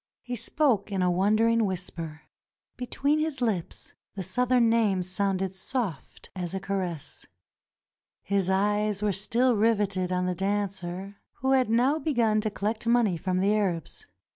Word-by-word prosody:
He 245 - -4
spoke 230 -3 +1
in 190 -2 0
a 180 - +3
wondering 215 +5 +3
whisper. 165 -4 -5 0.5
Between 280 +4 0
his 310 -3 -2
lips 215 -9 -2 0.2
the 195 - -4
Southern 245 +5 +2
name 215 -5 +2
sounded 190 0 -1
soft 190 - -4
as 180 0 -4
a - - -1
caress. 185 -6 -4 1.0
His 195 -2 0
eyes 205 +1 +1
were 210 - +2
still 235 +6 +2
riveted 205 -4 +1
on 180 0 0
the 180 - 0
dancer 195 0 -3 0.2
who 265 +1 -1
had 260 -3 +3
now 255 +7 +3
begun 235 -9 +1
to 215 - -1
collect 215 +3 -3
money 235 -6 +3
from 185 +2 -1
the 200 +2 +3
Arabs. 185 -7 -2
200 Hz, 145 wpm, -27 LUFS, 185-230 Hz, 1.0 s, a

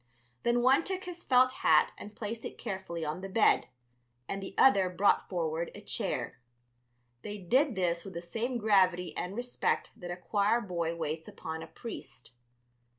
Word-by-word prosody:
Then 240 0 +2
one 265 +5 +5
took 380 0 -3
his 355 -1 -8
felt 255 0 +5
hat 155 -1 +5
and 210 0 -10
placed 225 +1 -5
it - - -6
carefully 180 -4 -4
on 155 +4 -3
the 195 - -6
bed, 210 +3 +4 0.6
and 195 - -3
the 195 0 -7
other 195 -9 +6
brought 195 +3 +2
forward 165 -2 -1
a - - -9
chair. - - -3 0.8
They 210 +7 -6
did 250 - +2
this 175 -2 0
with 195 -3 -9
the 170 - -3
same 235 +8 -2
gravity 185 -5 +3
and 180 +2 -3
respect 245 +1 -1
that 175 - -8
a 175 - -4
choir 205 +5 +2
boy 170 -6 -2
waits 160 -1 -3
upon 160 0 -6
a 165 - -7
priest. 230 - -9
195 Hz, 170 wpm, -31 LUFS, 170-235 Hz, 0.8 s, other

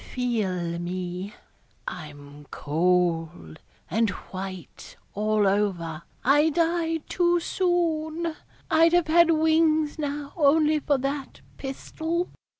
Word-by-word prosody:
Feel 190 -9 -1
me 180 +2 -4 0.6
I'm 145 -2 -9
cold 165 - 0 0.3
and 225 0 +1
white 185 -1 -8 0.2
all 215 0 +1
over 180 -6 0 0.2
I 295 +4 +5
died 330 0 0
too 350 -1 +2
soon 335 -2 -1 0.4
I'd 330 +1 +5
have 350 -2 +4
had 340 +1 +5
wings 315 -1 +2
now 290 -1 -4
only 305 0 +4
for 290 -1 +1
that 275 +1 -4 0.2
pistol. 320 +5 -3
275 Hz, 100 wpm, -25 LUFS, -, 0.6 s, I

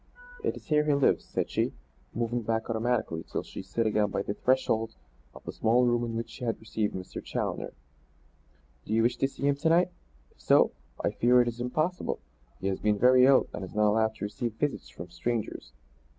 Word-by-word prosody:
"It 445 - 0
is - - -13
here 150 -1 +2
he 150 -1 +3
lives," 140 - +2
said - - -3
she; - - 0 0.4
moving 120 +1 -1
back 110 +1 -1
automatically 115 -7 0
till - - -2
she - - -8
stood 115 - -2
again 105 -1 +2
by 100 - -2
the 100 - -2
threshold 115 - +1 0.4
of - - -12
the - - -5
small 120 +3 +3
room 120 0 +2
in 115 -1 -3
which 115 0 -4
she 125 - -9
had 115 -2 -1
received 110 -1 -2
Mr. 95 -1 -6
Challoner. - - -3 1.1
"Do 110 - -4
you 115 - +3
wish 120 +1 +2
to 135 - +2
see 140 - -10
him 140 0 +2
to 160 +3 +1
night? 175 +2 +4 0.4
If - - -25
so, - - +5 0.3
I - - +2
fear 125 +1 +4
it - - -5
is 120 0 -4
impossible. 155 +9 -1 0.4
He - - -7
has 95 -1 0
been 105 -1 +2
very 125 +3 +6
ill 135 -1 +6
and 100 - -5
is 95 - -9
not 105 0 +4
allowed 110 0 +1
to - - -4
receive 105 +2 -3
visits 145 +5 -2
from 85 +1 -10
strangers." 115 - -3
115 Hz, 210 wpm, -28 LUFS, 110-125 Hz, 1.1 s, very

